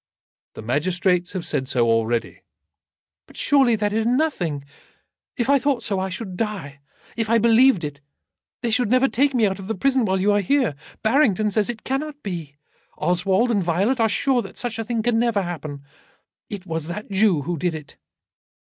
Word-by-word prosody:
"The -, -, -8 dB
magistrates 175 Hz, -, 0 dB
have 185 Hz, -3 st, -4 dB
said 130 Hz, -, -1 dB
so 120 Hz, -3 st, +1 dB
already." 115 Hz, +1 st, 0 dB, 0.9 s
"But -, -, -16 dB
surely 270 Hz, -5 st, +4 dB
that 210 Hz, -1 st, -1 dB
is 220 Hz, +1 st, +1 dB
nothing. 225 Hz, -, 0 dB, 0.7 s
If 240 Hz, -, 0 dB
I 280 Hz, 0 st, +4 dB
thought 260 Hz, -3 st, 0 dB
so, 200 Hz, -4 st, -1 dB
I 190 Hz, 0 st, -2 dB
should 190 Hz, 0 st, -6 dB
die. 190 Hz, -10 st, -4 dB, 0.4 s
If 225 Hz, -2 st, -2 dB
I 230 Hz, -, +4 dB
believed 230 Hz, -2 st, +4 dB
it, 145 Hz, -1 st, -6 dB, 0.6 s
they 235 Hz, -, 0 dB
should 235 Hz, -1 st, +1 dB
never 255 Hz, +3 st, +4 dB
take 275 Hz, +1 st, +1 dB
me 230 Hz, -3 st, +4 dB
out 195 Hz, -1 st, -1 dB
of 190 Hz, -, -8 dB
the 225 Hz, -, -2 dB
prison 260 Hz, +4 st, +2 dB
while 190 Hz, -1 st, 0 dB
you 200 Hz, +2 st, +3 dB
are 205 Hz, 0 st, +3 dB
here. 255 Hz, -, +1 dB, 0.3 s
Barrington 220 Hz, -4 st, +3 dB
says 210 Hz, -1 st, +1 dB
that 240 Hz, -, -1 dB
it 225 Hz, -, -19 dB
cannot 290 Hz, +2 st, -4 dB
be. 165 Hz, -7 st, -6 dB, 0.4 s
Oswald 190 Hz, +6 st, +1 dB
and 205 Hz, -4 st, +2 dB
Violet 195 Hz, +10 st, +1 dB
are 225 Hz, -1 st, +3 dB
sure 260 Hz, +3 st, +1 dB
that -, -, -10 dB
such 235 Hz, -2 st, -3 dB
a -, -, -1 dB
thing 230 Hz, -1 st, -2 dB
can 235 Hz, -1 st, +2 dB
never 230 Hz, -4 st, +1 dB
happen. 155 Hz, -5 st, -6 dB, 0.7 s
It 200 Hz, -4 st, -7 dB
was 160 Hz, -3 st, -3 dB
that 205 Hz, +4 st, -6 dB
Jew 195 Hz, -6 st, +3 dB
who 175 Hz, +3 st, -2 dB
did 175 Hz, 0 st, -1 dB
it." 150 Hz, -2 st, -10 dB
205 Hz, 190 wpm, -22 LUFS, 175-240 Hz, 0.9 s, surely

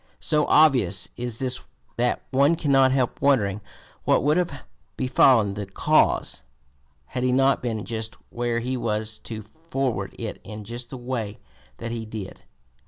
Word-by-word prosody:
So 150 Hz, -1 st, +2 dB
obvious 125 Hz, -, +4 dB
is 120 Hz, -2 st, -4 dB
this 130 Hz, 0 st, -2 dB, 0.4 s
that 120 Hz, +1 st, +1 dB
one 140 Hz, +5 st, +4 dB
cannot 135 Hz, -5 st, +4 dB
help 130 Hz, -2 st, 0 dB
wondering 105 Hz, -8 st, +2 dB, 0.4 s
what -, -, +3 dB
would 150 Hz, +2 st, +3 dB
have 165 Hz, -7 st, -1 dB, 0.4 s
befallen 125 Hz, -5 st, +4 dB
the 100 Hz, 0 st, -5 dB
cause, 95 Hz, -, +2 dB, 0.6 s
had 125 Hz, -, -4 dB
he 125 Hz, 0 st, +2 dB
not 135 Hz, +2 st, +3 dB
been 115 Hz, -4 st, -3 dB
just 110 Hz, -1 st, -4 dB, 0.2 s
where 120 Hz, -1 st, -1 dB
he 125 Hz, +2 st, -2 dB
was 110 Hz, -2 st, -2 dB
to 110 Hz, -2 st, -7 dB
forward 130 Hz, -, -3 dB
it 115 Hz, -3 st, -5 dB
in 105 Hz, -1 st, -8 dB
just 120 Hz, +3 st, -7 dB
the 130 Hz, -, -7 dB
way 120 Hz, -4 st, -4 dB, 0.4 s
that 115 Hz, 0 st, -5 dB
he 115 Hz, -1 st, -4 dB
did. 110 Hz, -4 st, -7 dB
120 Hz, 155 wpm, -25 LUFS, 110-135 Hz, 0.6 s, obvious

